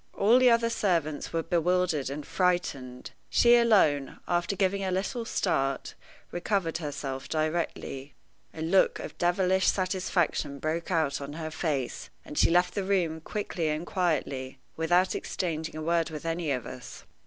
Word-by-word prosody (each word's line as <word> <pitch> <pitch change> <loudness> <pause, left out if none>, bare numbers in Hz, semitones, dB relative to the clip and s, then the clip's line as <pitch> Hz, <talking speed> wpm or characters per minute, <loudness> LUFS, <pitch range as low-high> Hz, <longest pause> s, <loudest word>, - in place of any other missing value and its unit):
All 225 +5 +5
the 255 -1 +6
other 230 0 +3
servants 165 -9 0
were 165 0 -1
bewildered 175 -4 +1
and 145 +2 -5
frightened. 140 -9 -1 0.2
She 240 0 +6
alone, 190 - +3
after 175 +3 0
giving 195 0 +1
a 190 - -1
little 195 +6 -2
start, 135 - -1 0.4
recovered 175 -2 -1
herself 140 -3 -5
directly. 155 -3 -2 0.4
A 160 - -6
look 185 +4 +3
of - - -7
devilish 185 +1 +2
satisfaction 185 -6 0
broke 160 +3 -3
out 160 -6 0
on 140 +1 -6
her 160 0 -5
face, 145 -5 -2 0.2
and - - -9
she - - +4
left 180 +1 +3
the 200 - -1
room 175 -5 0
quickly 170 -3 -3
and 155 +3 -2
quietly, 140 -8 -1 0.2
without 175 +3 +2
exchanging 160 -3 -3
a 155 - -5
word 170 +1 +1
with 155 0 -7
any 165 -1 -1
of 130 -4 -1
us. 125 0 -9
165 Hz, 155 wpm, -28 LUFS, 150-185 Hz, 0.4 s, the